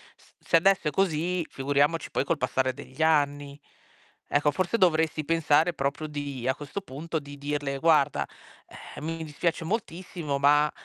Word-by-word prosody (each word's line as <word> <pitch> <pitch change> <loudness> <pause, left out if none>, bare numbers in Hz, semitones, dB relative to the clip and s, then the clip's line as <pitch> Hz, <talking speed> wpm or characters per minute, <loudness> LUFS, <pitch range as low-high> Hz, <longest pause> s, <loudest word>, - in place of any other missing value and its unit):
s - - -25
se - - 0
adesso 190 -2 +3
è - - +1
così, 175 -1 0
figuriamoci 145 +4 +1
poi - - 0
col 165 - 0
passare 130 +1 0
degli 130 +4 -9
anni. 145 -2 +1 0.7
Ecco, 145 +1 +3
forse 185 +8 0
dovresti 160 -4 +2
pensare 165 +1 +3
proprio 140 +2 -2
di 140 -4 -5
a 130 - +2
questo 150 +7 -6
punto, 160 +1 -4
di 145 0 -11
dirle: 145 -1 -3
"Guarda, 140 - +3 0.7
ehm, - - -8
mi 165 0 -3
dispiace 160 +2 -2
moltissimo, 170 -7 -3
ma, 145 +1 +4
150 Hz, 155 wpm, -27 LUFS, 140-165 Hz, 0.7 s, ma